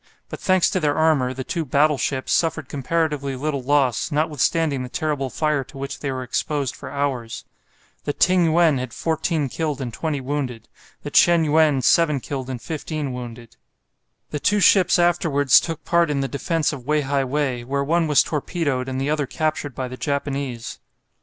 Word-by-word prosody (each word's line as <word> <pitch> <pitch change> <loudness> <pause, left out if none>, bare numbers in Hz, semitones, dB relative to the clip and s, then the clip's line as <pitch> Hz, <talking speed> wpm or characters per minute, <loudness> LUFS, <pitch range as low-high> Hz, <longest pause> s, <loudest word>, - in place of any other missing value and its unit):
But, - - -7
thanks 185 -2 +3
to 185 - 0
their 150 -3 +1
armour, 155 -5 +2
the 130 +1 -5
two 165 +5 -3
"battleships" 140 -2 +1
suffered 160 -4 0
comparatively 145 -1 -1
little 140 +1 -2
loss, 135 +2 +1
notwithstanding 150 -1 +1
the 125 - -6
terrible 145 -2 -2
fire 150 0 0
to 135 - -13
which 135 0 -5
they 140 - -3
were 130 -1 -4
exposed 140 +2 -2
for - - -9
hours. 135 -5 -3 0.6
The - - 0
"Ting 180 +1 +3
yuen" 160 -3 +3
had 125 -2 -6
14 160 -2 -1
killed 150 0 -3
and 125 -4 -5
20 155 0 -2
wounded, 130 -4 -4 0.4
the - - -6
"Chen 170 -1 +5
yuen" 150 -3 +3
7 150 +2 +3
killed 130 0 -5
and 130 -2 -4
15 155 -1 -4
wounded. 120 -2 -9 0.7
The 150 - -3
two 205 +7 +2
ships 185 -2 +5
afterwards 165 -6 +4
took 165 -2 -6
part 170 -2 +2
in 140 -2 0
the 135 - -1
defence 155 +3 -1
of 130 -3 -9
Wei 150 0 +2
hai 140 0 0
wei, 130 -2 -1
where 140 +3 -1
one 165 +3 +1
was 150 -2 +5
torpedoed 145 -4 -2
and 130 0 -3
the 140 +2 -1
other 150 -3 0
captured 150 -1 -2
by 130 -1 -3
the 130 +1 -8
Japanese. 140 -4 -3
145 Hz, 180 wpm, -22 LUFS, 130-160 Hz, 0.7 s, Chen